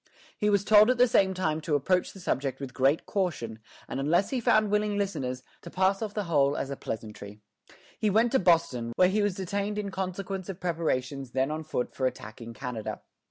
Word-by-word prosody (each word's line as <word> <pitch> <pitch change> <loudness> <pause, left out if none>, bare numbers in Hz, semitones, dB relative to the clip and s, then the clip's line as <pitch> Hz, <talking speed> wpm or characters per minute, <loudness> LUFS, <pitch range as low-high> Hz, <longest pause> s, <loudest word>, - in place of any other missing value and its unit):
He 210 - +1
was 200 -1 +3
told 215 +1 +7
at 255 - +3
the 250 +1 +6
same 190 -5 +3
time 160 -4 -1
to 150 -1 0
approach 180 +6 +1
the 195 - -12
subject 135 -5 -2
with 135 -2 -6
great 135 +4 +2
caution, 135 - -2 0.3
and - - -4
unless 170 +8 +2
he 260 - 0
found 215 -2 +3
willing 210 0 +1
listeners, 130 -11 -2 0.2
to 170 - -9
pass 190 +3 +1
off 215 -2 -4
the 210 - -1
whole 145 -5 +2
as 140 - -3
a - - -2
pleasantry. 105 -3 -7 0.6
He 215 - +2
went 225 +4 +3
to 265 - +3
Boston, 135 -10 +2
where 180 0 +5
he 210 +2 +1
was 205 -3 0
detained 200 +2 -2
in 200 -2 -3
consequence 190 0 -4
of 190 -1 -6
preparations 140 -7 -2
then 135 +2 +1
on 155 +1 -3
foot 150 -5 -3
for 130 - 0
attacking 115 -1 -8
Canada. 120 -3 -5
175 Hz, 205 wpm, -28 LUFS, 135-200 Hz, 0.6 s, told